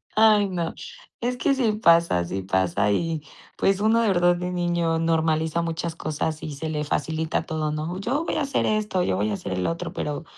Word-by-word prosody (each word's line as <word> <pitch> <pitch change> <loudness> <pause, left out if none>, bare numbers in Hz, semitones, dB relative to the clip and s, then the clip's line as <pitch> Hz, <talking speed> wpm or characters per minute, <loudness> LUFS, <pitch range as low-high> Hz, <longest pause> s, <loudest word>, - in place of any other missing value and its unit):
Ay, 215 -2 +5
no. 170 -3 -2 0.5
Es 245 +1 -1
que 275 - +2
sí 245 -5 +2
pasa, 170 - +4
sí 95 +2 -3
pasa, 95 +1 +1
y, 160 +6 -1 0.4
pues, 195 0 +2
uno, 225 +2 +4
de 225 - +2
verdad, 175 -2 +3
de 180 0 -3
niño 175 -2 0
normaliza 160 0 +1
muchas 165 0 -3
cosas 155 0 -3
y 155 - -4
se 160 +3 -4
le 150 -1 -2
facilita 160 +2 -1
todo, 155 -2 -2
¿no? 160 +5 -3
Yo 275 +10 -1
voy - - -2
a 310 - 0
hacer 275 -1 0
esto, 210 -4 0
yo 95 - 0
voy 105 +2 0
a - - -1
hacer 100 - -5
el 90 0 -1
otro, 165 0 -3
pero 150 +2 -3
165 Hz, 210 wpm, -24 LUFS, 155-195 Hz, 0.5 s, Ay